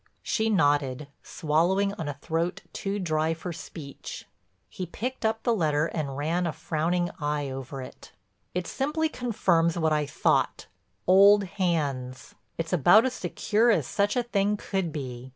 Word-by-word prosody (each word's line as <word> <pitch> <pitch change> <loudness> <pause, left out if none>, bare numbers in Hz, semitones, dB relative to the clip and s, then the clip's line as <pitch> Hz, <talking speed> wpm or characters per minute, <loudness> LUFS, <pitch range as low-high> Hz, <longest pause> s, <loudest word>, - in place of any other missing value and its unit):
She 220 0 0
nodded, 145 -6 +1
swallowing 175 +6 +1
on 165 -7 -5
a 145 - -3
throat 165 +6 -2
too 195 +1 -3
dry 160 -3 0
for 170 +2 -6
speech. 145 -3 -9 0.4
He 185 - -6
picked 250 +9 -5
up 220 0 0
the 235 - +2
letter 155 -6 +1
and 145 -5 -3
ran 170 +4 0
a - - -1
frowning 165 +3 -1
eye 145 -2 -1
over 135 0 -6
it: - - -12 0.4
"It 180 -1 -1
simply 305 - -1
confirms 175 - +1
what 160 -2 +2
I 150 -1 0
thought—old 200 +7 +3
hands. 150 -9 -2 0.2
It's 165 +2 -3
about 180 - +6
as 260 - 0
secure 215 +4 +1
as 225 - +3
such 205 0 0
a 245 - +1
thing 210 -3 +1
could 190 -5 -2
be. 130 -4 -6
170 Hz, 150 wpm, -27 LUFS, 150-200 Hz, 0.4 s, about